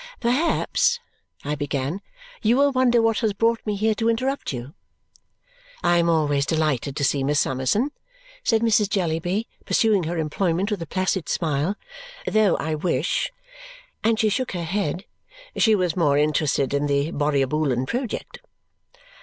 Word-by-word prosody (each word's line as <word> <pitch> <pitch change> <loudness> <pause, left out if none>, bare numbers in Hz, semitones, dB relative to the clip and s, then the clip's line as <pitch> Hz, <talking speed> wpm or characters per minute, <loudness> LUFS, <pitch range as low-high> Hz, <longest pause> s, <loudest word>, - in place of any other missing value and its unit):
"Perhaps," 340 - +1 0.5
I 145 - -1
began, 145 +4 -2 0.4
"you 230 +3 +3
will 285 +1 +4
wonder 250 -3 +3
what 225 -1 +2
has 220 -2 0
brought 225 +3 +1
me 210 - 0
here 215 +2 +1
to 225 +1 0
interrupt 260 +5 -1
you." 125 +2 -6 1.1
"I 175 - +4
am 170 0 +2
always 145 -4 +2
delighted 150 -4 0
to 145 - -2
see 140 0 +1
Miss 145 +1 +2
Summerson," 135 - 0 0.5
said 225 -1 +2
Mrs. 215 -3 +3
Jellyby, 180 +2 -1 0.2
pursuing 210 -6 +2
her 170 +2 -3
employment 170 +5 0
with 205 -4 -2
a 165 - -5
placid 185 +1 -1
smile. 160 +3 0 0.5
"Though 215 - +3
I 160 - -2
wish," 155 - 0 0.7
and 225 0 +2
she 215 - +3
shook 255 +3 -1
her 175 -2 -3
head, 175 0 -2 0.5
"she 220 -2 +4
was 180 -5 0
more 150 -5 +3
interested 145 -2 +1
in 145 +1 +1
the 140 +2 0
Borrioboolan 140 -3 0
project." 245 - -4
175 Hz, 150 wpm, -23 LUFS, 145-220 Hz, 1.1 s, will